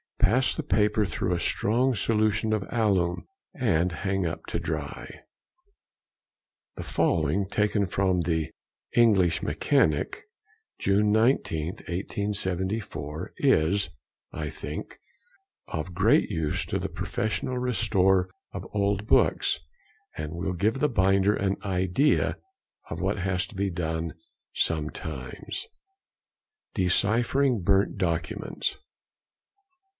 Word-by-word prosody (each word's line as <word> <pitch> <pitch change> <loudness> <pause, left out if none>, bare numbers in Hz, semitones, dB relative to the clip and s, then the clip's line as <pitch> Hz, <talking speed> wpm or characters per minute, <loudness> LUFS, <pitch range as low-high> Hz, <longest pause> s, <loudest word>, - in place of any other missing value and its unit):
_—Pass 125 +5 +3
the 160 - -3
paper 105 -5 +2
through 95 -2 -1
a 85 - -1
strong 120 +9 +1
solution 110 -1 +1
of 105 -2 0
alum, 100 -7 +1 0.3
and 90 - +1
hang 95 +2 -1
up 80 - -4
to - - -2
dry. - - -5 1.6
The - - -4
following, 90 - +1
taken 105 -1 +1
from 95 -1 +1
the 80 -2 0 0.5
"English 95 -8 +4
Mechanic," 75 -2 +1 0.6
June 105 +2 +3
19th, 105 - +1
1874, 95 -4 -3
is, 90 +6 +3 0.4
I - - -4
think, - - -7 0.7
of 80 +3 -4
great 105 +5 +3
use 80 -5 -1
to - - -1
the - - -3
professional 125 +4 -2
restorer 95 -6 +2 0.2
of - - -5
old 100 0 +1
books, 110 - +3 0.6
and 75 -1 -4
will 90 +2 -2
give 105 +8 0
the 150 - +2
binder 95 -2 +3
an 100 0 0
idea 95 - +2 0.5
of - - -5
what - - 0
has 95 0 0
to - - -14
be 100 +1 0
done 80 -2 -2 0.4
sometimes:— 80 - -3 1.1
"DECIPHERING 115 +6 +2
BURNT 95 +3 +2
DOCUMENTS. 85 -5 -2
95 Hz, 110 wpm, -27 LUFS, 85-110 Hz, 1.6 s, English